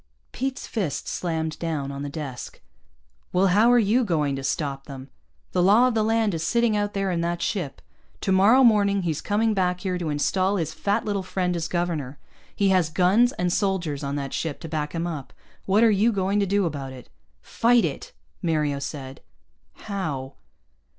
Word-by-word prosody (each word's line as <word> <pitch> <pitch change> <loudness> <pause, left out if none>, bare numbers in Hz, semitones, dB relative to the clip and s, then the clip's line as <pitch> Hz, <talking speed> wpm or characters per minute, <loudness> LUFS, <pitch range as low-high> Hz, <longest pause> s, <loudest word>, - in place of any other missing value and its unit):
Pete's 265 0 -3
fist 190 - -3
slammed 160 -3 -3
down 155 -5 -3
on 140 0 -6
the 145 - -4
desk. 140 -4 -7 0.7
"Well, 185 +1 +3
how 215 +6 +5
are 245 - +6
you 230 +3 +3
going 150 -8 0
to 135 - -5
stop 135 -2 -2
them? 135 -1 -9 0.4
The 180 - +1
law 210 +7 +5
of 250 - 0
the 220 - +1
land 220 -1 +1
is 165 - -3
sitting 235 +5 +2
out 205 0 -1
there 195 -1 0
in 170 -1 -1
that 170 0 -1
ship. 170 -10 -3 0.4
Tomorrow 200 +7 +4
morning 200 -4 +4
he's 160 -4 -2
coming 220 +2 +1
back 180 -2 0
here 185 -2 -2
to 165 -3 -3
install 185 +7 +1
his 160 -3 -2
fat 200 0 -1
little 205 -2 -1
friend 180 -1 -2
as 170 -1 -2
governor. 165 -7 -2 0.4
He 200 -1 +2
has 185 -4 +3
guns 190 +9 +3
and 180 -1 -1
soldiers 180 -9 -1
on 140 0 -2
that 140 -2 -4
ship 160 -4 -3
to 165 - -6
back 150 0 -3
him 165 +1 -1
up. 150 -7 -6 0.3
What 200 +4 +4
are 230 - +6
you 210 +3 +3
going 200 0 0
to 200 - +1
do 200 0 +2
about 140 -5 -4
it?" 125 -2 -12 0.4
"Fight 235 -3 +3
it," 150 - -5 0.3
Mario 150 -4 0
said. 135 -2 -7 0.6
"How?" 155 -11 -4
180 Hz, 190 wpm, -24 LUFS, 150-205 Hz, 0.7 s, are